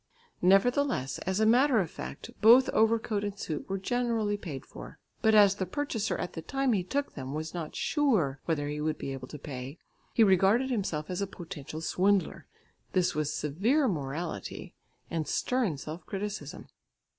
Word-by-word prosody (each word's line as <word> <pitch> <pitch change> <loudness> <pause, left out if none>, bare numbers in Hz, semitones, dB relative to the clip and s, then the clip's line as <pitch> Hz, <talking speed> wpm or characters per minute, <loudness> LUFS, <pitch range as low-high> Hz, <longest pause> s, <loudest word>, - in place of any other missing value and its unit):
Nevertheless, 195 - +3
as 190 +2 0
a 220 - +4
matter 245 +2 +5
of 175 -6 -1
fact, - - -8
both 240 +5 +7
overcoat 220 -1 +2
and 205 -1 -4
suit 160 -5 -5
were 195 - -1
generally 230 0 0
paid 160 -9 -7
for, - - -11 0.2
but 220 -2 +4
as 205 -2 +7
the 190 -2 -3
purchaser 230 -1 -2
at 180 - -4
the 165 - -5
time 270 - 0
he 190 -4 +1
took 280 +10 -2
them 135 0 -6
was 155 +1 -4
not 165 -3 -5
sure 205 - +1
whether 150 -3 -1
he 150 0 -3
would 155 0 -1
be 135 - -4
able 130 -1 -7
to 150 - -8
pay, 135 +1 -7 0.3
he 230 - +4
regarded 205 +7 +4
himself 185 -9 -2
as 180 - -2
a 200 - -1
potential 160 -4 -8
swindler. 195 +3 +1 0.5
This 180 -1 +2
was 150 -1 -1
severe 210 - +1
morality 150 - -4 0.4
and 160 -2 -2
stern 245 - 0
self 155 +5 -7
criticism. 200 -7 -5
190 Hz, 170 wpm, -29 LUFS, 155-225 Hz, 0.5 s, both